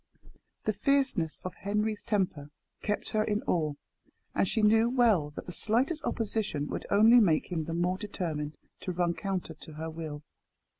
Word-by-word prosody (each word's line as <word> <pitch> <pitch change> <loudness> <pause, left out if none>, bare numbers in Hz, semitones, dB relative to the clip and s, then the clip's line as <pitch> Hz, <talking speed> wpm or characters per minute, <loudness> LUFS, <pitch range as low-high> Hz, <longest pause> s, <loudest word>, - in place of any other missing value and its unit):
The 215 - +2
fierceness 230 - +1
of 185 - -4
Henry's 210 +1 -1
temper 185 -9 -1 0.3
kept 210 - -1
her 215 0 +1
in 210 -1 -1
awe, 155 -4 0 0.6
and - - +2
she 220 +2 0
knew 220 +2 +5
well 225 - +3
that - - -6
the 180 - -6
slightest 255 - +1
opposition 210 -9 -1
would - - -4
only 220 +4 +7
make 175 -5 +2
him 160 -3 -1
the 165 - -3
more 180 +2 0
determined 160 -8 -4 0.2
to 185 - -4
run 175 -1 +1
counter 190 -3 -3
to 155 0 -11
her 160 +1 -5
will. 155 -2 -6
195 Hz, 165 wpm, -30 LUFS, 160-220 Hz, 0.6 s, only